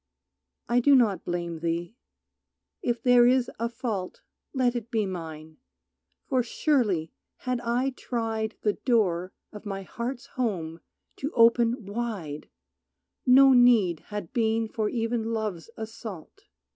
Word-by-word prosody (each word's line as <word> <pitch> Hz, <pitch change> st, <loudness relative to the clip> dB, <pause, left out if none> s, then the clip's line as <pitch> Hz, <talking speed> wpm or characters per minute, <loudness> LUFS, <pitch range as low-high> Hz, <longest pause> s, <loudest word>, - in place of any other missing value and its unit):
I 240 Hz, +1 st, +3 dB
do 280 Hz, +3 st, +5 dB
not 225 Hz, -7 st, +3 dB
blame 170 Hz, -2 st, -3 dB
thee. 170 Hz, +5 st, -3 dB, 0.9 s
If 240 Hz, -1 st, -1 dB
there 245 Hz, -1 st, +6 dB
is 255 Hz, 0 st, +2 dB
a 230 Hz, +1 st, -1 dB
fault 215 Hz, -6 st, -4 dB, 0.3 s
Let 250 Hz, -3 st, +1 dB
it 235 Hz, -1 st, -4 dB
be 220 Hz, -3 st, 0 dB
mine, 160 Hz, -4 st, -7 dB, 0.7 s
for 260 Hz, -2 st, +2 dB
surely 230 Hz, -, 0 dB, 0.3 s
had 250 Hz, -1 st, -2 dB
I 245 Hz, +3 st, 0 dB
tried 225 Hz, -3 st, -3 dB
The 210 Hz, -, +2 dB
door 185 Hz, -7 st, +1 dB, 0.2 s
of 210 Hz, -, -9 dB
my 195 Hz, -2 st, -5 dB
heart's 240 Hz, +6 st, -5 dB
home 175 Hz, -10 st, -3 dB, 0.4 s
to 285 Hz, +3 st, -3 dB
open 235 Hz, 0 st, +4 dB
wide 200 Hz, -9 st, -5 dB, 0.8 s
No 265 Hz, +1 st, +8 dB
need 230 Hz, -9 st, +5 dB
had 205 Hz, -5 st, -6 dB
been 225 Hz, -1 st, +1 dB
for 215 Hz, -1 st, -2 dB
even 230 Hz, -1 st, -1 dB
Love's 215 Hz, -5 st, -3 dB
assault. 220 Hz, -5 st, -8 dB
225 Hz, 130 wpm, -27 LUFS, 185-245 Hz, 0.9 s, No